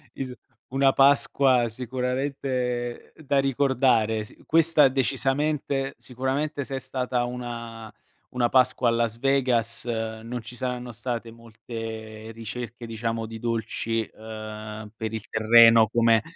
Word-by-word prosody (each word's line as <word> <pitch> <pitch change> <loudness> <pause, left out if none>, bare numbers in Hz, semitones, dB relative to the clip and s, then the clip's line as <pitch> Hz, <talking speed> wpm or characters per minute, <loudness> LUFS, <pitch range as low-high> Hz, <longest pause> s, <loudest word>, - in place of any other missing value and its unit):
Is 130 -2 -5 0.4
una 135 0 +3
Pasqua 135 -3 +4
sicuramente 125 0 -3
da 140 -3 0
ricordare. 125 -5 +2
S - - -14
questa 160 -3 +5
decisamente 135 +1 0
sicuramente 135 +3 -2
se 135 - -5
è 130 - -2
stata 125 -1 -2
una 115 -2 -6 0.4
una 125 -1 +1
Pasqua 130 -1 +3
a - - +2
Las 115 -1 0
Vegas 125 -4 +1
non 115 +1 -4
ci 120 +2 -10
saranno 125 -1 -4
state 120 0 -4
molte 110 -1 -8
ricerche, 115 +1 -7
diciamo, 115 0 -3
di 110 0 -8
dolci, 115 0 -2
ehm, 110 -1 -8
per 110 0 -4
il 110 -2 -5
terreno 115 0 +6
come 115 0 +4
120 Hz, 120 wpm, -25 LUFS, 115-130 Hz, 0.4 s, terreno